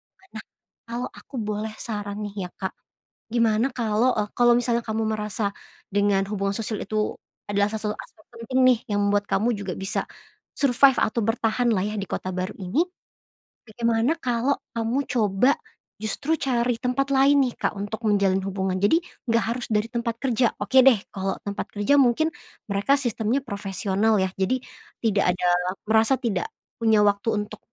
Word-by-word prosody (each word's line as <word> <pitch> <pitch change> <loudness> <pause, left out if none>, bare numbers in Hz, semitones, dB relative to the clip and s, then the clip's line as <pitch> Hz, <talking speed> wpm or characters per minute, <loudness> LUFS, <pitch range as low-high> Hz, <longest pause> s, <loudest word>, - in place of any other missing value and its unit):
kota 385 - -30
lama. - - -20
Nah, - - -10 0.4
kalau 240 +2 -3
aku 275 - -13
boleh 215 +1 -3
saran 205 -3 -5
nih 200 -3 -4
ya, - - -19
Kak, 190 -2 -3 0.6
gimana 230 +1 +3
kalau, 230 +1 +2
eee, 210 -1 -1
kalau 240 0 +6
misalnya 240 -1 +1
kamu 220 +1 -1
merasa 210 -1 -2 0.4
dengan 200 -1 +2
hubungan 200 -1 -1
sosial 220 -1 -3
itu 215 +1 -1 0.3
adalah 205 0 +2
salah 215 -1 -2
salah - - -8
satu - - -5
aspek 215 - -24 0.2
penting 255 +3 -1
nih, 245 -3 +5 0.2
yang 205 - +2
membuat 205 0 +1
kamu 230 +4 +1
juga 200 -3 -4
bisa 195 0 -2 0.5
survive 270 -1 +5
atau 225 - +1
bertahan 225 +2 +1
lah 185 - 0
ya, 210 - -4
di 195 - -4
kota 185 - -3
baru 185 0 -3
ini. 195 - +1 0.8
Bagaimana 235 +6 +1
kalau 245 +3 +1 0.2
kamu 230 +4 0
coba 215 +2 +3 0.5
justru 275 +8 -1
cari 240 -3 0
tempat 255 +3 0
lain 275 +1 +5
nih, 245 - -1
Kak, - - 0
untuk 205 +3 -4
menjalin 195 -2 +3
hubungan. 190 -1 -1
Jadi 205 - +4 0.3
nggak 230 -2 +3
harus 235 +3 -3
dari 210 +1 +1
tempat 235 -1 -2
kerja. 250 -2 +2
Oke 260 +6 +4
deh, 270 -3 +8 0.2
kalau 195 0 -2
tempat 200 0 -4
kerja 205 +8 +3
mungkin 275 +6 +3 0.4
mereka 200 +8 +3
sistemnya 240 0 0
profesional 200 0 0
ya, 190 - -1
jadi 255 +7 +1 0.4
tidak 200 -5 +2
ada 180 - -1 0.4
merasa 225 +4 +4
tidak 240 - -1 0.3
punya 220 -2 +4
waktu 205 +2 +1
untuk - - -11
220 Hz, 170 wpm, -24 LUFS, 200-245 Hz, 0.8 s, deh